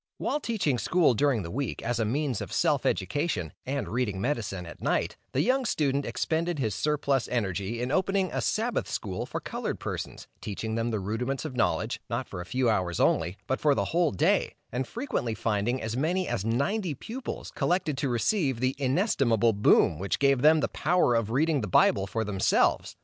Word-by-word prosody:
While 295 - -1
teaching 190 - 0
school 170 -3 +3
during 120 -2 +1
the 85 - -6
week, 135 +3 -3
as 120 0 -1
a 110 - +1
means 130 0 -1
of - - -6
self - - +2
education, 95 - -1
and 140 +1 -2
reading 110 -6 -1
medicine 100 -7 -2
at 85 - -11
night, - - 0 0.2
the - - +1
young 260 +2 +2
student 140 - 0
expended 165 +1 -1
his 110 -7 -1
surplus 140 -1 0
energy 100 -1 -2
in 125 +2 -2
opening 190 +2 +1
a - - -1
Sabbath 230 +3 -1
school 95 -3 -3
for - - -4
colored - - -4
persons, - - -5 0.2
teaching 110 +2 -4
them 115 +1 0
the 110 -2 -1
rudiments 125 +9 -2
of 140 -5 -5
knowledge, 120 - 0
not - - -2
for 90 - -6
a 90 - -9
few 130 +2 0
hours 95 -6 0
only, 85 +4 +2
but 130 - -1
for 145 -2 +3
the - - 0
whole 170 -1 +3
day, 95 - +1 0.2
and 125 +2 -2
frequently 225 - -2
finding 110 +4 0
as 110 -1 -3
many 175 +7 0
as 95 - -2
ninety 145 - 0
pupils 235 - -6
collected 175 -4 0
to 140 -2 0
receive 135 - +1
the 130 +1 +1
inestimable 130 - +2
boon 100 -5 +4
which 100 +1 -1
gave 140 -2 +3
them 155 +2 +6
the - - +1
power 175 -6 +2
of 115 -2 +1
reading 145 +4 +2
the 105 - -3
Bible 95 +2 +3
for 110 +4 -2
themselves. 100 -3 +1
130 Hz, 195 wpm, -28 LUFS, 110-155 Hz, 0.2 s, them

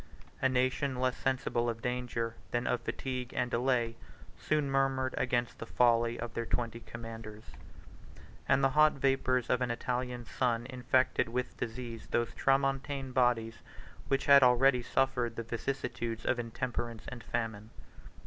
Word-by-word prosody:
A 130 - +4
nation, 130 +1 +1
less 130 -1 +1
sensible 130 -3 0
of 115 -1 -5
danger 125 -2 -2 0.2
than 120 0 -1
of 125 - 0
fatigue 130 -2 -4
and 125 -1 0
delay, 120 -2 +1 0.4
soon 150 -2 0
murmured 135 -1 +1
against 120 -1 -1
the 115 - -6
folly 120 -1 +3
of 115 -1 -5
their 115 -1 -3
twenty 115 -1 -2
commanders; 115 -2 -9 1.1
and 140 - +4
the 135 - +4
hot 155 +1 +5
vapors 135 -2 +1
of 125 - +1
an 125 - 0
Italian 125 0 -2
sun 120 -1 0
infected 130 -1 +1
with 125 +2 -3
disease 115 -1 -6
those 120 -1 0
tramontane 135 0 0
bodies 120 -3 +2 0.5
which 135 0 +1
had 140 -1 +8
already 125 +1 +5
suffered 125 -2 0
the 115 - -4
vicissitudes 120 -1 -3
of 120 - +1
intemperance 115 -1 -4
and 120 -3 -8
famine. 110 -2 -3
125 Hz, 145 wpm, -32 LUFS, 115-130 Hz, 1.1 s, had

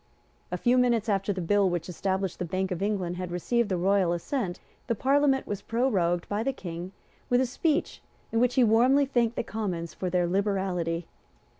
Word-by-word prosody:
A - - -1
few 250 +1 +3
minutes 235 -3 +2
after 195 0 +1
the 190 -2 -3
bill 200 +3 +3
which 175 -2 -3
established 190 +1 -2
the - - -1
Bank 185 +2 -2
of 180 - -3
England 190 -4 -1
had 180 -1 -4
received 215 +6 0
the 185 - 0
royal 185 -1 +2
assent, 180 - -3 0.3
the 230 - 0
Parliament 270 +3 +2
was 205 -1 -4
prorogued 195 -8 0
by 205 +1 -1
the 270 - 0
King 175 -4 -7 0.4
with 245 - +4
a 260 - +3
speech 300 +5 -1 0.3
in 225 - +1
which 245 0 +2
he 255 - +5
warmly 245 +5 +4
thanked 240 -3 +1
the - - -1
Commons 185 -7 -4
for 185 - -3
their 180 0 +1
liberality. 180 -3 -1
200 Hz, 190 wpm, -27 LUFS, 180-240 Hz, 0.4 s, he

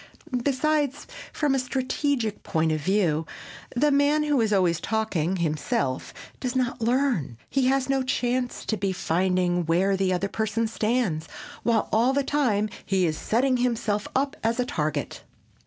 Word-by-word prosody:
Besides, 290 +1 0 0.3
from 295 -3 +1
a 270 - +2
strategic 255 -2 -1
point 160 0 0
of 155 -1 -1
view, 165 -3 +1 0.5
the 295 +4 +3
man 285 +2 +3
who 295 -4 +2
is 220 -1 +1
always 180 -4 +2
talking 195 -6 -1
himself 150 -5 -1 0.3
does 250 0 -3
not 250 -1 -1
learn; 235 - +1
he 270 -2 +2
has 270 0 +2
no 270 -1 +1
chance 250 -1 -1
to 220 - -1
be 195 -2 -1
finding 180 0 +1
where 185 +4 +3
the 190 -1 +1
other 185 +2 0
person 220 +2 -1
stands, 220 -7 0 0.3
while, 230 -2 +1
all 235 +5 +4
the 280 0 +1
time, 245 -8 +1 0.2
he 190 -2 +1
is 155 -2 0
setting 250 - +1
himself 230 -4 0
up 275 +1 +1
as 230 +2 0
a 250 - +2
target. 150 - -2
225 Hz, 155 wpm, -25 LUFS, 185-260 Hz, 0.5 s, all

